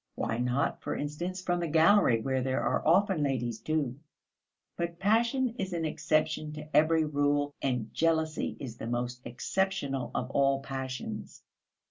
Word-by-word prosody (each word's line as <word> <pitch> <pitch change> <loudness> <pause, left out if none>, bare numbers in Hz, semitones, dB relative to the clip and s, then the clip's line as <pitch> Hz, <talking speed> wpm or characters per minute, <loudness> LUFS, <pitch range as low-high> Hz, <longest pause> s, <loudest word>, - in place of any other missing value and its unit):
Why 115 +1 -2
not, 125 +3 0
for - - -3
instance, 175 +6 -4
from 175 -1 0
the 170 - -1
gallery 160 - +5
where 130 +2 0
there 130 0 0
are - - +1
often 190 0 +4
ladies 120 -5 -1
too? 145 -5 -1 0.8
But 170 0 -3
passion 230 +7 +2
is 190 -2 -2
an 165 -1 -1
exception 155 0 0
to 150 0 -8
every 160 +1 +4
rule, 145 -1 +1
and 125 -5 -1
jealousy 160 -1 0
is 120 -5 -7
the 110 - -6
most 120 +1 -2
exceptional 140 +1 -1
of 125 +2 -2
all 135 -1 +3
passions. 130 -5 -6
145 Hz, 150 wpm, -30 LUFS, 130-170 Hz, 0.8 s, gallery